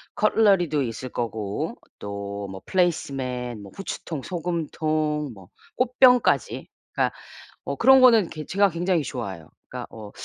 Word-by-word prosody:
커틀러리도 195 -9 +3
있을 125 +1 -5
거고 110 -4 -3 0.2
또 100 0 -5 0.3
뭐 95 0 -8
플레이스 175 -6 +1
매트, 125 -3 -4
뭐 100 -1 -11
후추통, 165 -6 -5
소금통 155 -4 -2
뭐 95 -3 -15 0.3
꽃병까지 250 0 +3 0.3
그러니까 - - 0 0.5
어 - - -3
그런 265 0 +7
거는 230 -8 +6
괴 155 -2 -7
제가 200 0 +3
굉장히 175 0 0
좋아해요. 100 - -6 0.2
그러니까 - - -6
어 105 -2 -9
155 Hz, 310 characters per minute, -24 LUFS, 120-190 Hz, 0.5 s, 그런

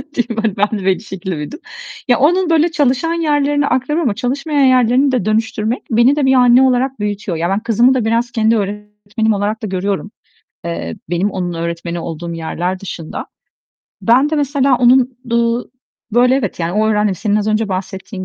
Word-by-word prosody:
Değil 240 -1 -1
mi? 230 - -3
Hani, 220 -3 0
ben 210 +1 0
de 190 - -7
bir 190 -1 +2
şekilde 190 -5 -6
büyüdüm. 150 - -7 0.5
Ya, 245 0 +3
onun 350 +5 +3
böyle 330 +1 +3
çalışan 295 +1 +1
yerlerini 290 -3 +1
aktarıyorum 295 +6 0
ama 200 - -3
çalışmayan 275 +5 0
yerlerini 255 +1 +3
de 250 -7 0
dönüştürmek 220 +1 -1
beni 235 +5 +4
de 295 -2 +1
bir 265 - +4
anne 250 -1 +5
olarak 260 0 +1
büyütüyor. 205 -4 -3
Ya, 170 +2 -1
ben 195 +2 0
kızımı 235 +3 +3
da 250 -4 0
biraz 230 +2 0
kendi 225 -1 +2
öğretmenim 210 +1 -3
olarak 205 +2 -2
da - - -2
görüyorum. 195 +1 -3 0.5
Eee, 85 - -4
benim 180 +4 0
onun 180 -2 -3
öğretmeni 170 +1 -4
olduğum 170 0 -6
yerler 175 +3 -3
dışında. 170 -4 -7 0.8
Ben 255 +6 +3
de 315 - 0
mesela 280 -2 +2
onun, 250 0 +3
uuu, 235 +1 0 0.4
böyle, 250 +2 +4
evet 245 -8 -2
yani 165 +1 -1
onu 215 +2 +1
öğrendim, 210 -2 +1
senin 205 +3 -1
az 210 0 0
önce 215 0 0
bahsettiğin 190 +1 -5
225 Hz, 185 wpm, -16 LUFS, 195-260 Hz, 0.8 s, anne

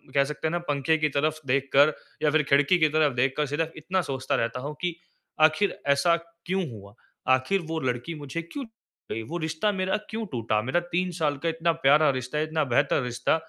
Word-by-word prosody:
कह 140 - +5
सकते 150 +2 -3
हैं - - -1
ना 175 - 0
पंखे 145 +2 +2
की 155 -1 +1
तरफ़ 155 +3 0
देख 135 +1 +1
कर 145 +2 +6 0.3
या 150 - +4
फ़िर 155 -1 +3
खिड़की 145 +6 +4
की 155 -1 +4
तरफ़ 150 -2 +2
देख 130 +2 +2
कर 150 - +2
सिर्फ़ 155 +3 -1
इतना 185 +5 -1
सोचता 130 -5 -2
रहता 115 +2 -1
हूँ 145 +3 -4
कि 175 -2 -1 0.5
आख़िर 155 +6 +4
ऐसा 140 +5 +4 0.3
क्यों 185 0 0
हुआ? 100 -2 -11 0.4
आख़िर 130 +10 +1
वो 160 0 -1
लड़की 130 +4 -2
मुझे 145 +2 -5
क्यों 220 - -7
छोड़ 225 0 -13
गई 115 - -3
वो 170 - -4
रिश्ता 160 +5 0
मेरा 190 +1 0
क्यों 225 0 -3
टूटा, 115 -4 0
मेरा 130 +9 +1
3 180 +1 0
साल 150 -3 +1
का - - +3
इतना 165 +1 +1
प्यारा 150 +2 +6
रिश्ता, 130 +3 -2
इतना 155 0 0
बेहतर 140 +2 +2
रिश्ता। 125 +4 0
150 Hz, 215 wpm, -26 LUFS, 135-165 Hz, 0.5 s, कर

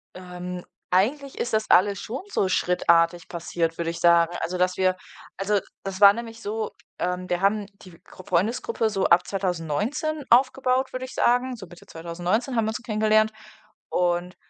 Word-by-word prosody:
Ähm, 180 0 -7 0.3
eigentlich 265 +10 +1
ist 240 - -2
das 215 0 +1
alles 200 +2 +4
schon 250 +8 -5
so 190 - +1
schrittartig 170 -2 +2
passiert, 170 -1 -2
würde 165 -1 -2
ich 170 - -6
sagen. 170 0 +4
Also, 180 +2 -3
dass 180 0 +1
wir 185 -1 +2 0.4
also, 200 +1 0 0.2
das 195 0 -6
war 200 -1 +9
nämlich 230 0 -8
so, 215 0 -3 0.3
ähm, 180 0 -2
wir 175 - -1
haben 205 +1 +2 0.2
die 180 -3 -15
Grupp 185 - -14
Freundesgruppe 225 - 0
so 195 -3 -1
ab 170 +1 +4
2019 195 - -2
aufgebaut, 255 +1 +3
würde 255 0 -4
ich 260 - -9
sagen. 250 +1 +1
So 200 -4 -10
Mitte 175 0 -16
2019 175 +10 -2
haben 225 - +2
wir 220 - 0
uns 220 - -4
so - - -19
kennengelernt 215 0 +2 0.6
und 175 0 0
195 Hz, 175 wpm, -24 LUFS, 175-225 Hz, 0.6 s, war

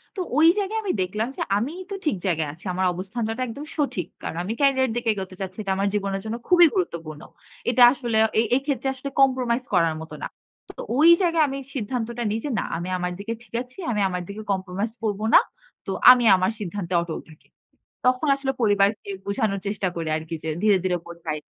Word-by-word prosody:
তো 380 - -2 0.2
ওই 320 +2 +7
জায়গায় 410 +2 -1
আমি 395 - 0
দেখলাম 210 +5 -1
যে - - -4 0.2
আমিই 300 - -3
তো 395 - -2
ঠিক 300 - +2
জায়গায় 160 -5 0
আছি। 175 +7 -18
আমার 185 +1 0
অবস্থানটা 215 +5 -4
টা - - -4
একদম 280 +6 -7
সঠিক। 275 - -1 0.2
কারণ - - -4
আমি 210 +5 -3
ক্যারিয়ারের 265 -3 +3
দিকে 240 -1 -1
এগোতে 190 -2 -6
চাচ্ছি। 185 -1 -5
এটা 195 - -2
আমার 200 +1 +1
জীবনের 195 -1 -1
জন্য 220 +1 -3
খুবই 350 -2 +7
গুরুত্বপূর্ণ। 165 - -3 0.5
এটা 245 0 +5
আসলে 240 -5 -2 0.2
এ-এইক্ষেত্রে 270 +4 0
আসলে 265 +1 -6
কম্প্রোমাইজ 255 -2 +2
করার 165 -3 +3
মতো 160 - -9
না। - - -1 0.5
তো - - -5 0.2
ওই 315 +4 +7
জায়গায় 335 -3 +3
আমি 275 - -4 0.2
সিদ্ধান্তটা 235 -1 -3
নিই 220 - -1
যে, - - -2
না, - - -1
আমি 175 +2 -5
আমার 180 0 -2
দিকে 215 +3 -4
ঠিক 230 - -25
আছি, 255 +1 -13
আমি 210 -3 0
আমার 180 -1 -3
দিকে 205 +2 -6
কম্প্রোমাইজ 195 +3 -2
করব 205 -2 -1
না। - - +10 0.5
তো - - -3 0.2
আমি 250 -1 +5
আমার 185 +3 +1
সিদ্ধান্তে 190 -2 -4
অটল 170 -2 -4
থাকি। 155 - -18 0.6
তখন 255 +4 +2
আসলে 275 -1 -2
পরিবারকে 200 -1 +2 0.2
বুঝানোর 200 -1 -1
চেষ্টা 200 -2 -1
করি 165 -1 -3
আরকি 160 +1 -5
যে - - -3
ধীরে, 210 -2 +5
ধীরে 180 -1 +1
বোঝাই। 165 -3 -5
210 Hz, 200 wpm, -24 LUFS, 185-255 Hz, 0.6 s, না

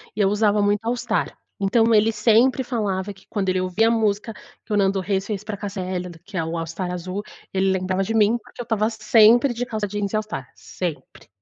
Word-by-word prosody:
e - - -7
eu 195 - +4
usava 210 0 +2
muito 205 +2 +1
All 235 +2 +1
Star. 235 -2 -2 0.2
Então, 225 +4 +3
ele 215 +2 +4
sempre 230 +4 +3
falava 205 -6 -2
que, 195 -1 -16
quando 195 -3 -2
ele 185 0 +1
ouvia 185 +5 +1
a - - +3
música 220 -1 0 0.3
que - - -14
o 210 - +2
Nando 195 -1 +2
Reis 195 0 -1
fez 210 -2 -4
para 210 -1 -4
a - - -12
Cássia 200 -1 -5
Eller, 180 -2 -5
que 200 -1 -8
é 165 - +1
o 165 +1 -4
All 165 -1 -3
Star 180 +2 -4
azul, 185 +3 -4 0.3
ele 190 0 +1
lembrava 185 0 0
de 225 - -2
mim, 220 +1 +4
porque 240 - -11
eu - - -4
estava 220 -2 0
sempre 225 +3 +5
de 245 +2 -2
calça 215 -3 -3
jeans 205 0 -3
e - - +1
All 215 - +2
Star, 135 -12 -6
sempre. 160 -8 -6
205 Hz, 240 wpm, -22 LUFS, 190-220 Hz, 0.3 s, sempre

